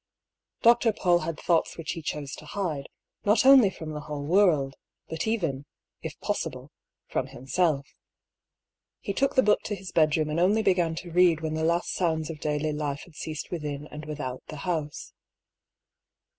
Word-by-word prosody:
Dr. 235 -1 +5
Paull 175 -3 +3
had 165 -1 -4
thoughts 165 -2 +1
which 165 - -4
he 165 - -5
chose 145 -2 -4
to - - -11
hide, 165 -9 -3 0.3
not 210 +4 +3
only 265 -6 +8
from 160 -4 -7
the 150 - -4
whole 150 -1 -5
world, 160 -6 +3 0.3
but 160 +5 -3
even, 160 -11 -1 0.3
if - - -7
possible, - - -3 0.3
from - - -2
himself. 140 +1 0 1.1
He 200 - -4
took 275 +6 +1
the 260 - +5
book 210 - +3
to 205 - -2
his 190 -2 -9
bedroom 155 -1 +2
and 155 - 0
only 205 +5 +3
began 175 -4 +2
to 170 +1 -7
read 175 -2 +4
when 155 -1 -2
the 160 0 -1
last 170 +2 +1
sounds 160 -3 0
of 155 - -9
daily 150 0 -1
life 145 -1 -3
had 175 - -16
ceased 155 0 -6
within 150 -4 -4
and 150 +1 -7
without 145 -4 -5
the - - -7
house. 155 -5 -3
160 Hz, 170 wpm, -27 LUFS, 150-180 Hz, 1.1 s, only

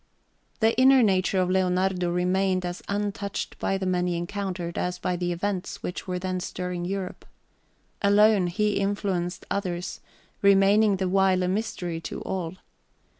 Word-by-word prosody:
The 225 +1 +4
inner 265 -1 +7
nature 190 -2 +2
of 185 0 +1
Leonardo 185 -1 +1
remained 185 +1 +1
as 175 0 -4
untouched 200 0 -3
by 195 - 0
the 190 - -3
men 180 -1 +1
he 175 -1 -1
encountered 180 -1 -4
as 180 0 -2
by 180 - -1
the 175 0 -2
events 185 +1 -3
which 180 - -5
were 180 -1 -2
then 185 0 -2
stirring 180 -1 -4
Europe. 190 0 -4 0.8
Alone, 205 -1 +5
he 210 +4 0
influenced 195 -3 -2
others, 180 -3 -3 0.4
remaining 200 +1 +5
the 190 0 -1
while 190 0 +3
a - - +1
mystery 185 -4 -2
to - - -6
all. 185 -2 -4
185 Hz, 150 wpm, -26 LUFS, 180-200 Hz, 0.8 s, inner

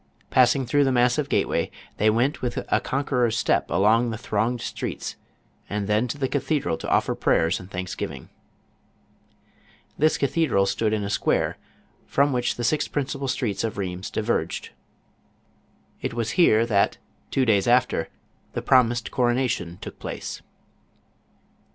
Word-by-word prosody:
Passing 130 +1 +4
through 145 +4 +3
the 135 - +2
massive 125 +3 +2
gateway, - - +1 0.3
they 110 - +3
went 120 +7 +1
with 125 - -3
a - - +4
conqueror's 125 -4 0
step - - +1
along 115 +4 +3
the 110 - -4
thronged 115 +2 -1
streets, - - -4 0.5
and 105 0 -2
then 105 +4 +1
to 145 - -4
the 135 -2 0
cathedral 140 - 0
to - - -5
offer - - +2
prayers 80 +1 +1
and 90 - -11
thanksgiving. 90 -1 -5 1.7
This 155 +2 +3
cathedral 140 -8 +2
stood 105 +3 0
in 110 -1 0
a 100 - -3
square, - - 0 0.5
from 140 0 +2
which 125 -1 0
the 120 - -4
six 150 +5 +1
principal 140 -1 -3
streets 105 -6 -1
of 115 - -2
Rlieims 95 -1 -4
diverged. 105 -7 -2 1.3
It - - -3
was 115 -1 -1
here 115 -10 +4
that, 100 -4 +2 0.3
two 135 - +1
days 105 -3 +3
after, 125 +1 +2 0.4
the - - -3
promised 120 -2 +3
coronation 120 -8 0
took - - -9
place. - - -6
120 Hz, 145 wpm, -24 LUFS, 105-130 Hz, 1.7 s, Passing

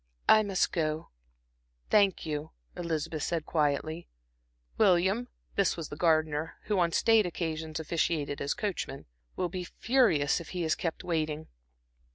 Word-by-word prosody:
"I 215 - +7
must 200 -3 +1
go, 155 -1 -1 0.8
thank 200 -5 +4
you," 150 0 -3 0.3
Elizabeth 165 -2 -3
said, 165 0 -1
quietly. 155 +2 0 0.7
"William," 195 +4 +3 0.3
this 200 -3 +1
was 165 -3 -5
the - - -6
gardener, 155 -1 +1
who 210 -3 0
on 170 -1 +2
state 220 +2 +4
occasions 160 -2 -3
officiated 155 -3 -1
as 140 - -1
coachman 200 - -4 0.3
"will 180 - -1
be 180 +1 -4
furious 175 - +2
if 170 - -10
he 175 - 0
is 160 -1 +2
kept 165 -2 -3
waiting." 155 -2 -2
165 Hz, 140 wpm, -30 LUFS, 155-185 Hz, 0.8 s, I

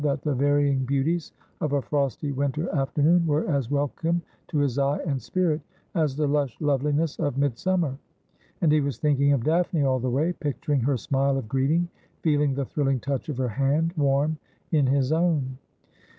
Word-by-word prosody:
231 145 -2 +1
that - - -13
the 140 -3 0
varying 145 -2 +2
beauties 140 +6 0 0.3
of 150 -2 -1
a 140 - +2
frosty 140 0 -1
winter 140 +4 -1
afternoon 150 +4 +3
were 150 +1 +1
as 140 -7 0
welcome 145 +4 0 0.3
to - - -3
his 140 -2 +1
eye 140 +1 +2
and 140 -5 -1
spirit 155 - 0 0.3
as 155 -6 +1
the 150 +1 0
lush 140 -3 0
loveliness 150 +1 0
of 145 -3 -1
midsum 145 +7 +1
mer; 140 -5 -1 0.7
and 165 -4 +4
he 155 0 +4
was 140 -4 -2
thinking 140 0 +2
of 135 -5 +2
Daphne 165 0 +1
all 130 -1 +2
the 125 +1 -1
way, 150 +8 +1
picturing 150 -2 -1
her 130 +2 +1
smile 135 +2 0
of 130 - -4
greeting, 140 +8 +1 0.4
feeling 150 -3 +2
the 140 0 -1
thrilling 135 -1 0
touch 135 +2 -3
pf 150 -5 -4
her 130 -2 0
hand, 140 +7 +1
warm 145 +1 +1 0.3
in 150 -5 +3
his 135 +1 +2
own. 155 -6 +1
145 Hz, 185 wpm, -25 LUFS, 135-155 Hz, 0.7 s, and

